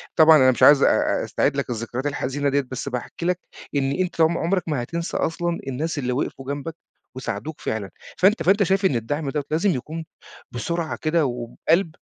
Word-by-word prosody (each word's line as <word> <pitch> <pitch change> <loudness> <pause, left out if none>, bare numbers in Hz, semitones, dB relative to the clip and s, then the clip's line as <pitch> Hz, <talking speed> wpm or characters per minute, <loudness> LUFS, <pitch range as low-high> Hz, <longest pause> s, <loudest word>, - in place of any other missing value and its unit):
طبعًا 160 -1 +8
أنا 130 -2 +6
مش 125 - -1
عايز 145 -1 +8
آآ، - - +2
أستعيد 140 0 0
لك 140 - -2
الذكريات 120 +3 -4
الحزينة 140 0 -1
ديَّة، 140 +1 +2
بس 130 - -4
باحكي 125 +7 -5
لك 180 0 +1 0.4
إن 135 -1 +1
أنت 180 +1 -1
ع - - +8
عُمرك 170 +2 0
ما 145 -6 -1
هتنسى 170 +6 -3
أصلًا 170 +1 -1
الناس 150 +5 -2
اللي 125 -2 -1
وقفوا 135 0 -3
جنبك 150 +3 -6 0.4
وساعدوك 130 +3 -5
فعلًا، 105 -3 -3 0.3
فأنت 200 +4 +3
فأنت 200 +3 +4
شايف 195 +2 +1
ان 140 - +3
الدعم 145 +6 -2
دوَّة 150 +1 -2
لازم 165 +6 +2
يكون 160 +3 -4 0.5
بسرعة 165 +6 -3
كده، 155 0 +2
وبقلب؟ 130 +8 0
150 Hz, 185 wpm, -23 LUFS, 130-170 Hz, 0.5 s, طبعًا